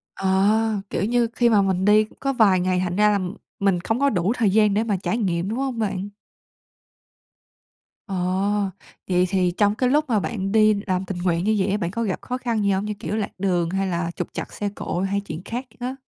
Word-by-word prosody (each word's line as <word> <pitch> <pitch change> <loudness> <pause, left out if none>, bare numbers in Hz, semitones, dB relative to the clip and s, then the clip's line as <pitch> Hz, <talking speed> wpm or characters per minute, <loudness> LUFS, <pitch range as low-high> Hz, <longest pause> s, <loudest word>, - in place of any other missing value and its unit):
Ờ, 205 +3 +2
kiểu - - -1
như, 235 +1 +2
khi 240 -1 +3
mà 210 -3 +4
mình 190 -1 0
đi 210 +1 +5 0.2
có 275 0 0
vài 200 -7 +4
ngày 180 0 +1
thành 180 0 -2
ra 210 0 +4
là 205 - +2 0.4
mình 195 -3 +2
không 225 +7 -1
có 280 0 +3
đủ 185 +1 +1
thời 220 -5 +2
gian 210 0 +3
để 215 +2 +1
mà 205 -4 0
trải 220 +5 -2
nghiệm, 180 -3 -1
đúng 225 - -3
hông 265 -3 -2
bạn? 200 -2 -2 2.0
Ồ, 195 - -5 0.9
vậy 180 0 +3
thì 185 -2 +1
trong 205 -1 +3
cái 250 +3 +1
lúc 300 +2 +3
mà 220 -4 +2
bạn 195 -3 -3
đi 215 -1 +5
làm 185 -1 0
tình 185 -1 -5
nguyện 175 -1 0
như 215 +1 +2
vậy 195 0 +1
á, 205 - +1
bạn 175 -4 -2
có 230 +4 -3
gặp 200 -5 -2
khó 250 - -4
khăn 235 -4 -1
gì 200 - +2
hông? 195 +1 0
Như 210 - -3
kiểu 205 +1 -4
lạc 210 -2 -2
đường 180 -3 0
hay 195 +1 -1
là 170 -2 -2
trục - - -3
trặc - - -6
xe 205 - -3
cộ 175 - -3
hay 195 +1 0
chuyện 170 -4 -7
khác 245 +5 -5
á. 255 +2 -3
200 Hz, 230 wpm, -23 LUFS, 185-220 Hz, 2.0 s, đi